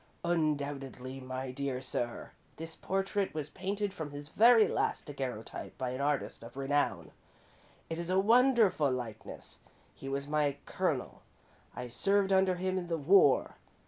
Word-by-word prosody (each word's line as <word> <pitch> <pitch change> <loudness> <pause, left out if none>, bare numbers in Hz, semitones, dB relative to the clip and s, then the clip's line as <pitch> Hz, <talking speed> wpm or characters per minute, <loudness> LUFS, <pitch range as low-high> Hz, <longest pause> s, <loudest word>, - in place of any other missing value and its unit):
"Undoubtedly, 140 -5 -2
my 130 0 -5
dear 135 -1 -3
sir. 120 -2 -4 0.3
This 165 0 -8
portrait 195 -1 -1
was 150 -2 -4
painted 200 +1 -3
from 160 -6 -5
his 145 +1 -9
very 225 +3 +6
last - - -1
daguerreotype 130 -6 -6
by 130 -1 -2
an 130 +2 -4
artist 145 -1 -1
of 115 +3 -11
renown. 145 +1 0 0.8
It 165 0 -4
is 170 0 -4
a 185 - +2
wonderful 225 - +4
likeness. 120 -4 -6 0.3
He 135 - -8
was 140 +1 -3
my 145 -2 +1
Colonel - - -2 0.5
I 125 - -5
served 195 - +1
under 190 -1 +4
him 185 +1 -1
in 175 - -6
the 165 -1 -1
war. 150 -3 +4
150 Hz, 145 wpm, -32 LUFS, 135-190 Hz, 0.8 s, very